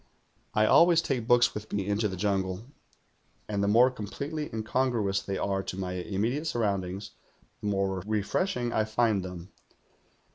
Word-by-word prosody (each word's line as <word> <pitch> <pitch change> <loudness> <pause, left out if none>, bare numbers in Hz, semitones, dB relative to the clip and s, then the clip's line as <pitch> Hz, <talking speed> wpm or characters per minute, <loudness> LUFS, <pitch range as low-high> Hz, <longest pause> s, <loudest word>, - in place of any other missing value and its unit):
"I 105 0 +4
always 170 +8 +6
take 125 -7 -2
books 120 -1 +5
with 105 +1 -7
me 100 -2 -1
into 105 +2 +1
the 95 - -5
jungle, 95 +1 -1 0.8
and 100 -2 -1
the - - +2
more 120 +5 +5
completely 140 +7 -5
incongruous 110 -3 0
they 95 0 -3
are 95 -1 -1
to 95 - -6
my 90 -1 -3
immediate 105 - -2
surroundings 100 -5 -2 0.5
the - - -4
more 95 -2 0
refreshing 120 - -1
I 110 - +2
find 110 -2 +1
them. 90 0 -8
105 Hz, 150 wpm, -28 LUFS, 95-120 Hz, 0.8 s, always